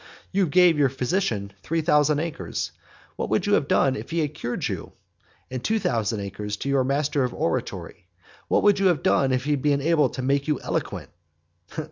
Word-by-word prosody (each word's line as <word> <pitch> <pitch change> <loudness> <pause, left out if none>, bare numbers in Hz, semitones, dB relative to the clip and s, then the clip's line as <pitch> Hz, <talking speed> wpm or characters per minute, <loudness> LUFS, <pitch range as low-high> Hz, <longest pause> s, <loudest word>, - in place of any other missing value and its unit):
You 190 -1 +2
gave 175 0 +5
your 140 -2 +4
physician 125 - -1
three 165 +9 -1
thousand 150 -2 +3
acres; 150 - -4 0.5
what - - -3
would - - +1
you - - +1
have - - +3
done 135 -1 +3
if - - -7
he 165 - -3
had 150 -1 -2
cured 120 -4 -3
you? - - -5 0.6
and 130 -1 -4
two 220 - +1
thousand 110 - -1
to 105 +5 -4
your 135 -1 +3
master 140 +1 0
of 125 - -2
oratory; 85 +1 -3 0.4
what - - +2
would 205 -1 +4
you 195 - +4
have 170 -7 +1
done 135 -1 +3
if 130 0 0
he 150 - -1
had 145 -2 +1
been 145 -1 +2
able 155 +1 +3
to 130 - -5
make 140 +2 +1
you 150 -4 +1
eloquent? - - -3
140 Hz, 195 wpm, -24 LUFS, 125-160 Hz, 0.6 s, gave